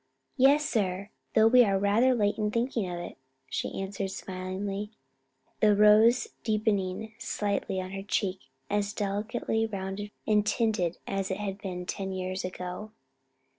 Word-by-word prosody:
"Yes, 280 +3 +5
sir, 200 -6 -1 0.2
though 220 - +6
we 245 +2 +7
are 195 -3 +2
rather 215 +6 +3
late 205 -1 +1
in 210 -1 +1
thinking 230 -3 -1
of 175 - -4
it," 175 - -7 0.3
she - - -3
answered 195 0 -3
smilingly, 190 +2 -4 0.7
the 210 -1 +5
rose 215 +4 +6
deepening 215 -1 0
slightly 200 -2 -1
on 185 0 -5
her 195 0 -4
cheek 195 -1 -1 0.3
as 205 0 0
delicately 215 +2 -1
rounded 195 0 -4 0.2
and 210 -1 +3
tinted 215 -6 0
as 195 -1 -2
it 190 - -1
had 200 -1 -4
been 180 -4 -5
ten 195 +1 -3
years 185 0 -3
ago. 180 +3 -5
205 Hz, 145 wpm, -29 LUFS, 190-220 Hz, 0.7 s, we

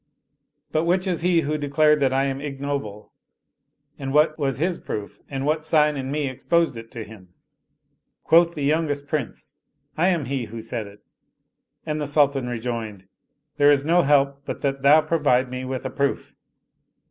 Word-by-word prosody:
But 155 +1 +1
which 180 +2 +1
is 180 -4 -1
he 175 -1 +3
who 150 0 -2
de 145 -1 -4
clared 150 +1 +4
that 135 -2 +2
I 135 +1 +2
am 135 0 -3
ignoble 140 -7 -5 0.9
and 135 -1 -4
what 155 +2 +3
was 140 -4 -2
his 170 +4 -1
proof 100 -1 -6
and 135 -1 -3
what 155 +1 0
sign 150 -2 +3
in 135 -1 -4
me 145 0 -1
exposed 165 +4 0
it 115 0 -9
to 115 - -5
him? 95 -5 -15 0.4
" - - -51
Quoth 170 +1 +4
the 145 - -4
youngest 145 -1 0
Prince, 145 -7 -4 0.2
" - - -42
I 175 - +4
am 170 -6 +1
he 130 -1 -2
who 115 +1 -8
said 115 -1 -4
it 100 +1 -15 0.4
"; - - -52
and 155 -1 -2
the 145 - -2
Sultan 140 -3 +2
rejoined, 115 -5 -5 0.2
" - - -52
There 145 0 +5
is 145 -1 +3
no 170 +3 +4
help 140 -2 +2
but - - -6
that 135 -1 -1
thou 145 +3 +6
provide 145 -6 +1
me 130 0 -5
with 130 0 -5
a 130 - -3
proof." 140 +1 -2
140 Hz, 195 wpm, -23 LUFS, 130-155 Hz, 0.9 s, thou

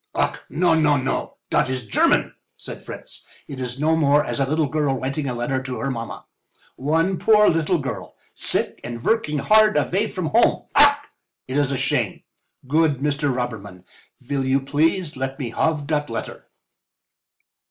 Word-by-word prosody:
"Ach, - - 0
no, 175 0 +2
no, 150 -2 +3
no—dot 130 -1 -2
is 130 -2 -3
German," 105 - +2 0.2
said - - -9
Fritz. - - -10 0.2
"It 135 - -8
is 125 +1 -4
no 160 +2 +2
more 150 -1 +3
as - - -3
a 135 - +1
little 155 0 +1
girl 145 -3 0
writing 135 +2 -3
a 125 - -3
letter 130 +2 -1
to 130 -1 -5
her 135 - -2
mamma. 115 -2 -6 0.5
One 165 +7 0
poor 210 -1 +5
little 165 +2 +2
girl, 140 -4 -6 0.2
sick - - -1
and 120 0 -6
vorking 155 - 0
hard 215 +8 +5
avay 200 +5 +1
from 185 -7 -4
home. - - +3
Ach! - - +7 0.5
it 130 - -4
is 145 -2 +2
a 135 - -1
shame. 135 - -1 0.4
Good 155 +1 +3
Mr. 145 +1 0
Robberman, 105 -7 -5 0.3
you 125 - -25
vill 135 +1 +1
please 150 +5 0
let 135 +1 -3
me 125 -5 -4
have 155 +2 0
dot 150 -2 -1
letter?" 115 -1 -6
145 Hz, 165 wpm, -22 LUFS, 130-160 Hz, 0.5 s, Ach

